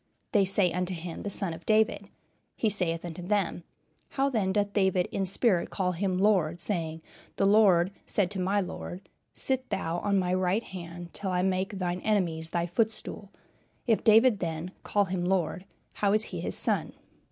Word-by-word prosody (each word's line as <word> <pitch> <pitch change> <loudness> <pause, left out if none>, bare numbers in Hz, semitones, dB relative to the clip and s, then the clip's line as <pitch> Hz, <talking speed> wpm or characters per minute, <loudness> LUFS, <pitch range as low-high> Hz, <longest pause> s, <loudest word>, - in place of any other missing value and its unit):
They 200 -3 +4
say 190 -2 +2
unto 180 0 -2
him, 170 0 -7
the 205 - -4
Son 195 -3 0
of 165 +1 -10
David. 220 +1 +1 0.5
He 220 - +1
saith 175 -4 +1
unto 175 +1 -6
them, 185 -2 -1 0.5
How 275 0 0
then 205 -6 0
doth 205 0 0
David 190 -3 +2
in 195 -1 -1
spirit 195 -1 +2
call 185 -2 -1
him 185 +1 -1
Lord, 185 -5 +2
saying, 165 -5 0 0.3
The - - +1
Lord 195 -3 +5 0.2
said 205 - +2
unto 195 +1 -3
my 195 +3 +1
Lord, 180 0 -7 0.3
Sit 260 -1 -1
thou 170 -2 -2
on 200 +1 +1
my 180 -1 +1
right 185 +4 +1
hand 175 -2 -9
till 195 - -4
I 180 0 0
make 190 +2 -1
thine 180 -1 -2
enemies 170 -7 0
thy 170 0 -1
footstool? 215 +2 -2 0.6
If 225 -3 +2
David 225 0 +5
then 165 +1 -4
call 205 -1 +1
him 185 -1 -3
Lord, 180 0 -1 0.3
how 200 -1 +1
is 215 +1 +4
he - - -3
his - - 0
son?" - - +1
190 Hz, 180 wpm, -28 LUFS, 175-205 Hz, 0.6 s, Lord